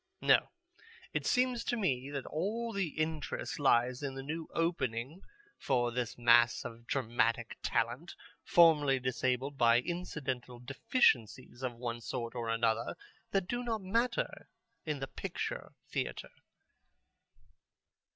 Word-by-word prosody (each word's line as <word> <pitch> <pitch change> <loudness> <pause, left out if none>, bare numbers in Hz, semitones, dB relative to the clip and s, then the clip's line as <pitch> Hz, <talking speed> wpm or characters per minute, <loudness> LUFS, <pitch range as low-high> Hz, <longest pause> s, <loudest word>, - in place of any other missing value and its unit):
No, - - +4 0.6
it - - -1
seems 250 -2 +2
to 240 - 0
me 135 - 0
that 140 -2 -4
all 225 +8 -2
the 195 -3 0
interest 155 -1 -2
lies 125 -2 +3
in 140 -2 -4
the 135 - -5
new 160 +3 -4
opening 145 -2 -1 0.4
for 120 -3 +1
the 120 -1 -2
mass 120 0 +5
of 115 0 -8
dramatic 115 -2 0
talent 125 +9 -1 0.3
formerly 150 -6 +5
disabled 130 +2 -1
by 120 -1 +6
incidental 130 -6 -4
deficiencies 130 - +1
of 125 -2 -3
one 120 0 -4
sort 115 0 -4
or 120 -2 -3
another 115 0 +1 0.3
that 195 -2 0
do 245 +4 -2
not 225 -4 -2
matter 235 - -1 0.4
in 150 -1 -1
the 135 - -2
picture - - -5
theatre...." - - -4
135 Hz, 125 wpm, -33 LUFS, 120-170 Hz, 0.6 s, by